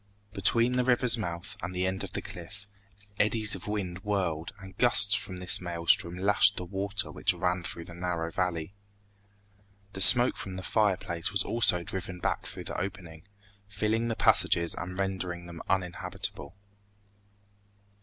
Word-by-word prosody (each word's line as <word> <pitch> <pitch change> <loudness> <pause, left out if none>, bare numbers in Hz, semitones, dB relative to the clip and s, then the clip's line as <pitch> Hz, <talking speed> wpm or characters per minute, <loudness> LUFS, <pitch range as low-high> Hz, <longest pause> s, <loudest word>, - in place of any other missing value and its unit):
Between 115 +5 +2
the 125 0 0
river's 125 -1 +3
mouth 85 -7 -6
and 90 +2 -6
the 90 +1 -1
end 95 +1 -3
of - - -8
the - - -5
cliff, 95 +4 -10 0.5
eddies 110 0 +2
of 95 0 -5
wind 95 -4 -4
whirled 90 -6 -3
and 95 -1 -13
gusts 110 -4 +5
from 100 -2 0
this 90 0 +4
maelstrom 85 0 +4
lashed 100 +1 +3
the 90 - -3
water 100 +2 -4
which - - -1
ran 90 0 -2
through 85 -1 -5
the 90 - -12
narrow 85 -1 -4
valley. 90 0 -3 1.2
The 95 - -6
smoke 120 +5 +9
from 95 -1 -5
the 95 - -7
fireplace 95 -4 -1
was 100 -2 +1
also 90 -7 +2
driven 95 0 -6
back - - -3
through - - -8
the - - -5
opening, 90 -3 -8 0.4
filling 110 +3 -2
the 115 - -3
passages 85 -5 +2
and 90 +1 -7
rendering 95 -3 -4
them 85 -1 -10
uninhabitable. 90 -4 -4
95 Hz, 155 wpm, -27 LUFS, 85-105 Hz, 1.2 s, smoke